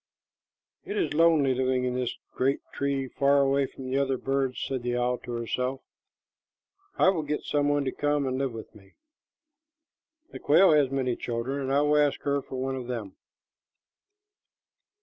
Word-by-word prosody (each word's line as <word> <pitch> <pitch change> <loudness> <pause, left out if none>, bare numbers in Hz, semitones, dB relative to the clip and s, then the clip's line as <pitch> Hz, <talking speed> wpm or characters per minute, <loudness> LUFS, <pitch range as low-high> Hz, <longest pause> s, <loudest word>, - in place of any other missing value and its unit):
"It 410 +2 -5
is 390 - 0
lonely 155 -4 +4
living 130 0 0
in 125 -1 -1
this 125 -1 -2 0.2
great 135 +2 +1
tree 140 -1 -1
far 140 +2 +2
away 140 0 +2
from 130 - -11
the 130 +2 0
other 135 -1 0
birds," 135 0 -1
said 135 -2 -3
the 120 0 -1
owl 125 0 0
to 120 - -7
herself. 125 +3 -2 1.2
"I - - +5
will 180 -4 0
get 150 0 -3
some 145 -1 0
one 145 -1 +1
to 130 - -1
come 145 -1 0
and 130 0 -2
live 135 -2 -1
with 115 -1 -9
me. 95 -2 -18 1.4
The - - -8
quail 170 +6 +5
has 145 -3 +4
many 130 -2 -1
children, 120 +4 -3
and 135 0 -2
I 140 +1 +3
will 150 0 +3
ask 145 -1 +2
her 140 0 0
for 130 - -9
one 135 +1 -2
of 125 -2 -6
them." 115 -6 -5
135 Hz, 175 wpm, -27 LUFS, 125-145 Hz, 1.4 s, I